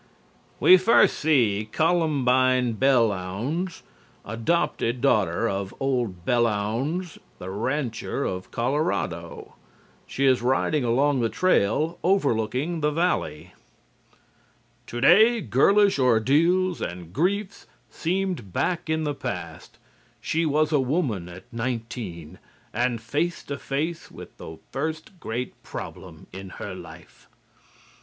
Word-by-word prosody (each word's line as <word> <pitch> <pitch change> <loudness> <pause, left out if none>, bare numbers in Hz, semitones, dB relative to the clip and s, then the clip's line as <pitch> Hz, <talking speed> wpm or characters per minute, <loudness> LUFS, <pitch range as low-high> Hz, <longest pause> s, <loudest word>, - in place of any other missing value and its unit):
We 185 - +8
first 185 +6 +4
see 110 -9 +2
Columbine 130 -7 +2
Belllounds, 125 - 0 0.4
adopted 115 +1 -1
daughter 110 -6 +2
of 95 -2 -3
old 120 -10 -1
Belllounds 120 - 0 0.2
the 95 - -7
rancher 130 +4 -2
of 90 0 -4
Colorado. 120 - -2 0.5
She 135 - -1
is 130 -3 +4
riding 130 +3 +1
along 135 +4 +2
the 115 -1 +1
trail 160 - +1
overlooking 145 - +1
the 150 - +2
valley. 150 - -1 1.3
"TODAY 215 - +5
GIRLISH 195 - +3
ORDEALS 150 +10 +3
AND 85 -1 -6
GRIEFS 195 - -1 0.2
SEEMED 180 - -2
BACK 170 - -1
IN 160 0 0
THE 150 -1 -1
PAST: - - -7 0.4
SHE 165 0 0
WAS 155 +1 +1
A 150 - +3
WOMAN 125 - -1
AT 90 +2 -11
NINETEEN 115 -8 -5 0.3
AND 120 -1 0
FACE 155 +9 -2
TO 140 0 -6
FACE 155 +5 -3
WITH - - -12
THE 80 - -9
FIRST 160 +6 -4
GREAT 120 0 -5
PROBLEM - - -9
IN 95 0 -8
HER - - -6
LIFE." - - -13
130 Hz, 110 wpm, -25 LUFS, 110-160 Hz, 1.3 s, We